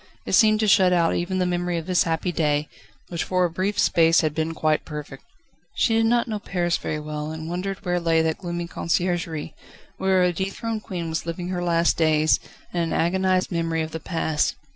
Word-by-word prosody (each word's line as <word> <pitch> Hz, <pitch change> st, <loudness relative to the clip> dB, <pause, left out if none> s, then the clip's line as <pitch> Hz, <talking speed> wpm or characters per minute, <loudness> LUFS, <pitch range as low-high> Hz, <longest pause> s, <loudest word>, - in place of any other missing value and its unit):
It -, -, -4 dB
seemed 215 Hz, -2 st, +5 dB
to 215 Hz, -, +2 dB
shut 185 Hz, -2 st, +5 dB
out 170 Hz, -2 st, +3 dB
even 180 Hz, +2 st, -1 dB
the 185 Hz, -, +1 dB
memory 175 Hz, -1 st, -1 dB
of 165 Hz, -, -4 dB
this 180 Hz, 0 st, +2 dB
happy 165 Hz, +2 st, -1 dB
day, 150 Hz, -3 st, 0 dB, 0.4 s
which 170 Hz, -2 st, -2 dB
for 185 Hz, -1 st, +1 dB
a 170 Hz, -, -2 dB
brief 190 Hz, +4 st, -2 dB
space 165 Hz, 0 st, +4 dB
had 155 Hz, -2 st, 0 dB
been 160 Hz, +1 st, -2 dB
quite 155 Hz, -1 st, +1 dB
perfect. 150 Hz, -3 st, -8 dB, 0.5 s
She 230 Hz, -, +2 dB
did 225 Hz, 0 st, +3 dB
not 240 Hz, +1 st, +2 dB
know 215 Hz, -2 st, -3 dB
Paris 175 Hz, -4 st, -1 dB
very 150 Hz, -, -3 dB
well, 150 Hz, 0 st, -5 dB
and 160 Hz, 0 st, -6 dB
wondered 195 Hz, +3 st, -4 dB
where 175 Hz, 0 st, +1 dB
lay 165 Hz, -1 st, +2 dB
that 160 Hz, -1 st, -1 dB
gloomy 175 Hz, -2 st, -4 dB
Conciergerie, 170 Hz, -2 st, -2 dB, 0.4 s
where 190 Hz, -1 st, +2 dB
a 180 Hz, -1 st, +2 dB
dethroned 210 Hz, +4 st, -3 dB
queen 175 Hz, -4 st, -5 dB
was 160 Hz, +1 st, -3 dB
living 175 Hz, +1 st, -4 dB
her 180 Hz, -1 st, -2 dB
last 170 Hz, -1 st, +2 dB
days, 155 Hz, -1 st, +3 dB, 0.3 s
in 175 Hz, -, -1 dB
an 165 Hz, -, -1 dB
agonised 185 Hz, +2 st, +1 dB
memory 165 Hz, -1 st, -1 dB
of 155 Hz, -, -6 dB
the 160 Hz, -, -5 dB
past. 160 Hz, -2 st, -1 dB
175 Hz, 205 wpm, -24 LUFS, 160-185 Hz, 0.5 s, seemed